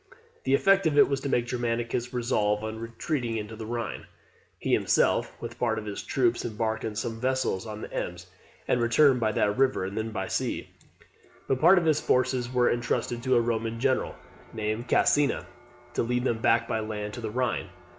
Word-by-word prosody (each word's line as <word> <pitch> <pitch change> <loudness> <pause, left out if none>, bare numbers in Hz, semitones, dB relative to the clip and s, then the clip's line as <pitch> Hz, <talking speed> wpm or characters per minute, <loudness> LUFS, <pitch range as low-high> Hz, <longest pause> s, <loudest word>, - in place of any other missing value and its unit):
The 135 +1 +4
effect 195 +3 +4
of 150 -2 0
it - - +7
was 140 -1 -1
to 140 - -3
make 120 -2 +1
Germanicus 120 0 -2
resolve 105 -4 0
on 110 0 -4
retreating 115 -1 -3
to 110 - -9
the 110 0 -7
Rhine. 115 -2 -4 0.5
He - - -1
himself, - - +2
with 120 0 -7
part 115 -2 +1
of 110 - -5
his 105 -1 -5
troops, 120 -3 +1
embarked 110 -1 -2
in 110 -1 -4
some 115 +1 -3
vessels 130 -6 0
on 110 0 -6
the - - -8
Ems, 90 0 -4 0.4
and 125 - +2
returned 125 +3 +4
by 110 -2 +1
that 105 0 +1
river, 130 -8 +2
and 95 +2 -5
then 110 0 -2
by 95 -4 -3
sea; - - -2 0.8
but 130 -1 0
part 175 +4 +7
of 175 - +2
his 155 -1 +3
forces 125 -1 +1
were 125 -1 +3
entrusted 120 0 -1
to 130 +1 +2
a 120 - +5
Roman 115 -1 -2
general, 130 +1 0 0.4
named 110 +2 -3
Caecina, 145 +4 +2 0.5
to - - 0
lead 125 +1 0
them 115 -3 0
back 115 +1 +3
by 110 - -1
land 105 -1 -4
to 120 - -6
the 110 - -3
Rhine. 125 +2 -1
120 Hz, 195 wpm, -27 LUFS, 110-130 Hz, 0.8 s, it